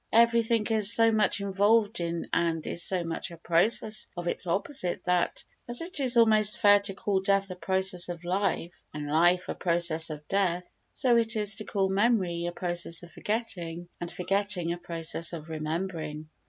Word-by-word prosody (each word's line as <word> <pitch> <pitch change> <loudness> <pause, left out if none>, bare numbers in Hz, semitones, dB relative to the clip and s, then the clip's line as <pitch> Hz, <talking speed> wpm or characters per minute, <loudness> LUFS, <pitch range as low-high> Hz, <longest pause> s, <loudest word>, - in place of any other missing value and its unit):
Everything 230 -1 +3
is 215 -2 +3
so 225 0 +5
much 215 -2 +1
involved 205 +3 +2
in 170 0 -3
and 165 -2 0
is 170 - -2
so 185 -1 +1
much 165 -1 -4
a 170 - -11
process 210 +6 +2
of 175 0 -5
its 175 - -1
opposite 185 +1 -1
that, 180 -1 0 0.2
as 240 - +2
it 335 -1 -2
is 255 -3 +1
almost 215 -2 +4
fair 205 0 +5
to 200 -1 -3
call 195 -1 -1
death 195 0 +1
a - - -6
process 190 -1 -1
of 175 -1 -7
life 180 -2 -1 0.2
and 150 -1 -5
life 175 +5 +2
a - - -3
process 170 -2 0
of 150 -1 -8
death, 180 -3 0 0.2
so 245 -2 +2
it 225 0 +1
is 210 -1 +2
to 215 - -3
call 195 -2 0
memory 190 -4 0
a - - -3
process 175 -1 -2
of 170 - -12
forgetting 175 -6 -4
and 175 0 -5
forgetting 185 -2 +1
a - - -6
process 170 0 -1
of 160 -1 -8
remembering. 155 -1 -4
185 Hz, 180 wpm, -27 LUFS, 170-210 Hz, 0.2 s, so